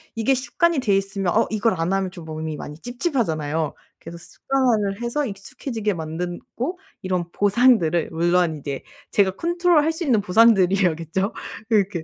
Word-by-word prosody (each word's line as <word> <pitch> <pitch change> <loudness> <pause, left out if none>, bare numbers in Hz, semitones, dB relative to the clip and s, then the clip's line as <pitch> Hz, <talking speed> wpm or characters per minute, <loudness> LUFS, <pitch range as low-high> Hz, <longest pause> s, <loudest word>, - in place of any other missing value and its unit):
이게 225 +4 +2
습관이 320 +5 +1
돼 210 -6 +2
있으면 195 -2 -1
어 225 - +3
이걸 220 +1 +1
안 165 +3 0
하면 195 -1 0
좀 175 -3 -10
몸이 155 -1 -5
많이 150 +1 -8
찝찝하잖아요. 165 - -2 0.3
그래서 170 +1 -9
습관화를 225 -2 -1
해서 240 +5 -1
익숙해지게 215 +1 -4
만든 170 +2 -4 0.2
고 315 +10 -3 0.2
이런 180 -3 -2
보상들을 200 -6 +3
물론 170 0 +1
이제 140 -1 -5 0.3
제가 195 -2 +3
컨트롤할 340 - +2
수 325 +2 -4
있는 235 -7 +3
보상들이어야겠죠. 190 -3 +3 0.4
이렇게 195 -6 +1
195 Hz, 365 characters per minute, -22 LUFS, 170-240 Hz, 0.4 s, 어